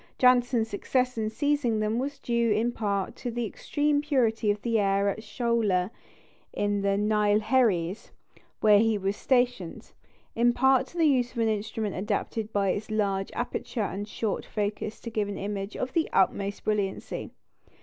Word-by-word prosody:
Janssen's 245 -2 +4
success 250 +4 -1
in 220 -1 -1
seizing 270 -2 0
them 215 +2 0
was 280 +2 -3
due 235 -3 0
in 220 +3 +2
part 200 -4 -2
to 250 - -4
the 240 0 -2
extreme 290 +6 0
purity 240 -7 +1
of 205 0 +1
the 230 -2 +1
air 200 0 +2
at 200 - -3
Sholoor, 220 -6 0 0.6
in 205 -1 0
the 200 0 +1
Neilgherries, 210 -2 +2 0.5
where 210 -1 +6
he 225 0 +2
was 195 0 -1
stationed; 245 -8 0 0.4
in 240 +1 +3
part 265 +1 +3
to 345 - -13
the 330 - +4
use 250 -5 +2
of - - -12
an 225 -1 +2
instrument 215 -1 -2
adapted 210 +2 -2
by 200 -2 +1
its 205 +4 -2
large 200 -3 0
aperture 240 -1 -3
and 200 +1 -4
short 215 -1 -2
focus 210 0 -3
to 230 - -6
give 215 -2 -1
an 200 - -5
image 200 0 -4
of 255 0 -3
the 330 - +1
utmost 200 +1 +1
brilliancy. 205 -3 -2
220 Hz, 165 wpm, -27 LUFS, 205-245 Hz, 0.6 s, where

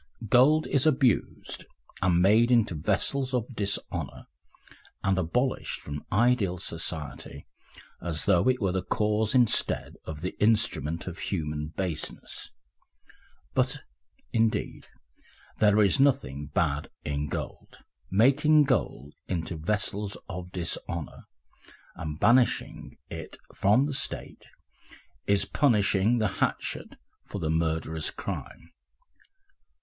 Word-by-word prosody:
Gold 150 +7 +5
is 140 +2 +2
abused 130 -7 +1 0.4
and 90 -1 +3
made 110 +5 +5
into 115 -6 +3
vessels 130 - 0
of 125 +1 -2
dishonour, 100 -2 -3 0.8
and 95 -1 +2
abolished 125 +10 -1
from 75 0 -7
ideal 110 -4 +2
society 80 -3 -5 0.6
as 85 -2 -2
though 90 0 +3
it 130 0 +2
were 95 -5 +1
the 95 0 -1
cause 105 +4 0
instead 120 -3 +2
of 80 -1 -7
the 90 - -4
instrument 85 -7 +1
of 95 0 -7
human 75 -5 -3
baseness; 90 -6 -4 1.0
but, - - 0 0.5
indeed, 115 -1 0 0.7
there 105 0 +5
is 100 +7 +3
nothing 125 - +1
bad 75 0 -1 0.2
in 75 +1 -2
gold. - - -6 0.3
Making 145 +9 +5
gold 100 - -1
into 85 -1 -3
vessels 100 +4 -2
of 90 +1 -7
dishonour 85 -3 -4 0.7
and 75 -1 -6
banishing 120 +1 +2
it - - -7 0.2
from 105 +7 +3
the 145 0 -2
State 135 - -4 0.8
is 100 -1 +4
punishing 105 -4 +3
the 110 -2 +2
hatchet - - -2 0.3
for - - -6
the 80 -1 -1
murderer's 80 -1 -1
crime. 85 - -7
100 Hz, 110 wpm, -27 LUFS, 80-120 Hz, 1.0 s, Gold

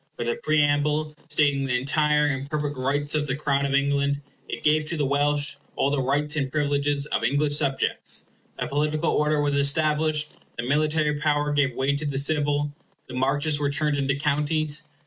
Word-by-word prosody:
With 120 - -3
a - - -1
preamble 150 0 +1 0.2
stating 145 -2 +2
the 125 -2 +1
entire 150 +3 +2
and 140 -1 -2
perfect 150 -1 -2
rights 140 +3 -1
of 150 -1 0
the 135 - -1
Crown 140 -1 0
of 140 - 0
England, 140 0 +1 0.3
it - - -5
gave 155 +1 +3
to 165 +2 +1
the 145 - +1
Welsh 145 +1 0 0.2
all 140 - +1
the 145 -2 +1
rights 145 +3 0
and 135 -3 -1
privileges 145 -1 0
of 115 - 0
English 145 +4 +1
subjects. 140 -3 -1 0.3
A - - -2
political 150 +3 0
order 150 0 +1
was 145 -1 +1
established; 150 +1 +2 0.3
the 115 - -2
military 150 +2 +1
power 150 -1 +1
gave 135 -4 +1
way 135 +2 +1
to 145 +2 -4
the 140 -2 -2
civil; 145 0 0 0.3
the 130 - -11
Marches 145 +4 0
were 145 -1 0
turned 150 +1 0
into 140 0 0
Counties. 150 +1 0
145 Hz, 185 wpm, -25 LUFS, 140-150 Hz, 0.3 s, gave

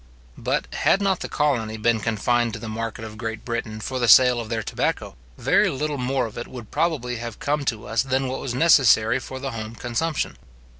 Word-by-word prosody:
But, - - -1
had 195 - +3
not 195 -2 +1
the - - -5
colonies 120 -7 0
been 110 +1 +2
confined 115 +1 0
to - - -5
the 115 - -7
market 110 0 -4
of 110 -1 -10
Great 115 -1 -5
Britain 115 -2 -3
for 130 +4 -4
the 120 - +1
sale 125 +2 +7
of 110 - -8
their 115 -1 -2
tobacco, - - -2 0.2
very - - +3
little 145 +1 -2
more 130 +1 0
of 110 - -7
it 120 - -6
would 120 -4 -10
probably 125 -8 -1
have 115 -1 -6
come 145 0 -1
to 110 -4 -2
us 115 - +1
than 135 0 0
what 130 +1 -4
was 125 -3 -4
necessary 125 -6 +5
for 130 +1 -7
the 135 0 -4
home 110 0 -6
consumption. 135 +7 -2
120 Hz, 210 wpm, -23 LUFS, 110-135 Hz, 0.2 s, sale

